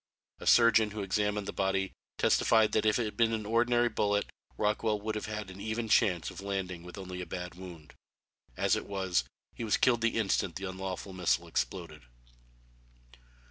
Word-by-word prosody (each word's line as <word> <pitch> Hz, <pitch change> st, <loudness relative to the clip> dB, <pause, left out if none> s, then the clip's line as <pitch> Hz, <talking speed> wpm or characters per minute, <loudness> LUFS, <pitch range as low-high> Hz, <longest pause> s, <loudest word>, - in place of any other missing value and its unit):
A -, -, -7 dB
surgeon 115 Hz, -2 st, +6 dB
who 105 Hz, -1 st, -5 dB
examined 105 Hz, +1 st, 0 dB
the -, -, -4 dB
body, 95 Hz, 0 st, 0 dB, 0.3 s
testified 110 Hz, -2 st, +4 dB
that 110 Hz, 0 st, +2 dB
if 105 Hz, -, +3 dB
it 120 Hz, -, 0 dB
had 105 Hz, -, -5 dB
been 115 Hz, -1 st, +2 dB
an 110 Hz, -1 st, -2 dB
ordinary 120 Hz, +2 st, +3 dB
bullet 105 Hz, -2 st, 0 dB, 0.3 s
Rockwell 105 Hz, 0 st, +1 dB
would 110 Hz, +1 st, -3 dB
have 105 Hz, 0 st, -4 dB
had 105 Hz, -3 st, -5 dB
an 95 Hz, +2 st, -10 dB
even 110 Hz, +2 st, -2 dB
chance 95 Hz, -7 st, +3 dB
of -, -, -9 dB
landing 95 Hz, -3 st, -3 dB
with 90 Hz, +2 st, -11 dB
only 90 Hz, -1 st, -6 dB
a 90 Hz, -, -6 dB
bad 90 Hz, +1 st, -5 dB
wound. 85 Hz, -4 st, -11 dB, 0.6 s
As -, -, +3 dB
it -, -, -4 dB
was 95 Hz, -9 st, 0 dB, 0.3 s
he -, -, -6 dB
was 110 Hz, -, +2 dB
killed 120 Hz, -2 st, +3 dB
the 115 Hz, 0 st, +1 dB
instant 95 Hz, -5 st, 0 dB
the 95 Hz, 0 st, -4 dB
unlawful 95 Hz, +1 st, -5 dB
missile 90 Hz, -2 st, +1 dB
exploded. -, -, -3 dB
105 Hz, 180 wpm, -31 LUFS, 95-110 Hz, 0.6 s, surgeon